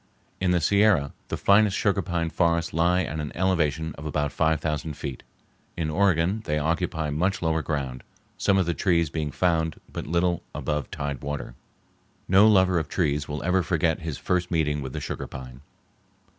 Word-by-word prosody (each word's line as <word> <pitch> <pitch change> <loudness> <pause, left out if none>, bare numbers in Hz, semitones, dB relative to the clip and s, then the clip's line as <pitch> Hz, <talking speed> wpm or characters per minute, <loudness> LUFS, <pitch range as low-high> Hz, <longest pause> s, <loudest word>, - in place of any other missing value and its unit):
In 95 - +1
the 90 -1 +3
Sierra 100 -4 +3
the - - -3
finest 100 0 +4
sugar 100 -1 +1
pine 85 -2 -2
forests 85 0 +1
lie 90 +3 +2
at 80 -1 -4
an 75 -1 -4
elevation 80 -4 0
of 75 - -8
about 75 -1 -1
five 80 -1 +1
thousand 75 -1 -3
feet. 70 -4 -5 0.6
In 80 -2 -1
Oregon 95 +3 +2
they 75 -1 0
occupy 80 0 -1
much 90 +6 0
lower 80 -1 +1
ground, 70 -5 -3 0.3
some 100 - +2
of 95 - +2
the 85 - 0
trees 85 0 +1
being 75 -2 -2
found 80 0 0
but - - -5
little 85 +1 +1
above 75 -1 -2
tide 70 -3 -4
water. 70 -4 -5 0.7
No 95 +3 +6
lover 95 -4 +4
of 80 - -5
trees 75 -5 0
will 75 +1 -4
ever 90 +1 +2
forget 85 -2 +1
his 80 -3 -5
first 90 -1 -1
meeting 75 -3 0
with 65 -1 -6
the - - -3
sugar - - -5
pine. 65 -1 -9
80 Hz, 180 wpm, -25 LUFS, 75-90 Hz, 0.7 s, No